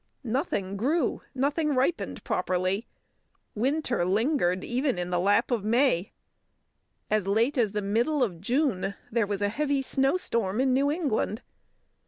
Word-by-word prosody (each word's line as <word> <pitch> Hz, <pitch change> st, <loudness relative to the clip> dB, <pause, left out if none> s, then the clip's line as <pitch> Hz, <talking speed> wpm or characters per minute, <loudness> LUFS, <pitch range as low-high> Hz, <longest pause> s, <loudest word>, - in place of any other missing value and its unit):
Nothing 220 Hz, -, -2 dB
grew, 275 Hz, -, 0 dB
nothing 290 Hz, +2 st, +1 dB
ripened 265 Hz, +7 st, -1 dB
properly. 185 Hz, +4 st, -1 dB, 0.7 s
Winter 255 Hz, -, 0 dB
lingered 190 Hz, -, +1 dB
even 255 Hz, 0 st, 0 dB
in 180 Hz, 0 st, -3 dB
the 175 Hz, -, +1 dB
lap 200 Hz, +7 st, +2 dB
of 230 Hz, -5 st, 0 dB
May. 225 Hz, -4 st, +2 dB, 1.0 s
As 215 Hz, -3 st, +1 dB
late 230 Hz, +8 st, +2 dB
as 225 Hz, -6 st, +1 dB
the 210 Hz, -1 st, -2 dB
middle 240 Hz, +8 st, +1 dB
of 175 Hz, -8 st, -3 dB
June 215 Hz, -5 st, 0 dB, 0.2 s
there 225 Hz, -2 st, +1 dB
was 205 Hz, 0 st, -2 dB
a 205 Hz, -, +2 dB
heavy 280 Hz, +3 st, 0 dB
snowstorm 255 Hz, -, 0 dB
in 260 Hz, 0 st, +3 dB
New 275 Hz, +2 st, +2 dB
England. 280 Hz, -, -1 dB
235 Hz, 140 wpm, -27 LUFS, 200-275 Hz, 1.0 s, in